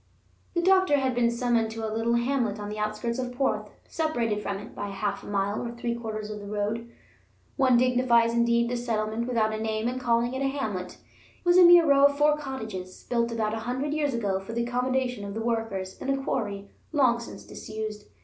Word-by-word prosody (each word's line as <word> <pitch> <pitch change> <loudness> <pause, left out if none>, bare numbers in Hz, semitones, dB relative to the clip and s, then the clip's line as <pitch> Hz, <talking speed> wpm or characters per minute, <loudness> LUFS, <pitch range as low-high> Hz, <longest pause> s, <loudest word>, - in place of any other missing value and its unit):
The 345 - +1
doctor 375 -5 +4
had 265 -2 0
been 240 -1 +2
summoned 235 -1 +1
to 225 -1 -3
a 215 - -4
little 230 +1 +1
hamlet 235 -3 0
on 205 0 -5
the 210 0 -5
outskirts 215 +3 -2
of 250 -1 -3
Porth, 270 +2 -1 0.2
separated 240 -10 -1
from 200 -1 -3
it 205 - -10
by 205 - -5
half 200 0 -3
a - - -12
mile 200 +1 -1
or 235 - -4
three 235 0 -2
quarters 215 -2 -5
of 210 -1 -6
road. 210 +3 -2 0.7
One 260 -3 +4
dignifies, 245 -2 +3
indeed, 235 0 +3
this 240 0 -3
settlement 220 0 -1
without 220 -3 +1
a 215 - -3
name 220 0 -1
in 250 +1 -2
calling 240 0 +1
it 265 - -3
a 275 - +2
hamlet; 215 -10 -3
it - - -27
was 350 +1 +6
a - - +9
mere 345 -1 +8
row 280 -1 +6
of 285 0 -4
four 295 +1 +4
cottages, 220 -11 -6
built 235 -1 +1
about 220 -2 -1
a 225 - -2
hundred 260 +6 -2
years 290 -4 0
ago 200 -5 0
for 195 +4 -8
the 235 0 0
accommodation 250 -1 -1
of 200 0 -6
the 225 - -3
workers 225 -5 -2
in - - -4
a 275 - +2
quarry 200 -6 -3 0.2
long 260 -6 +3
since 235 - -9
disused. 215 -1 -6
235 Hz, 215 wpm, -27 LUFS, 215-255 Hz, 0.7 s, a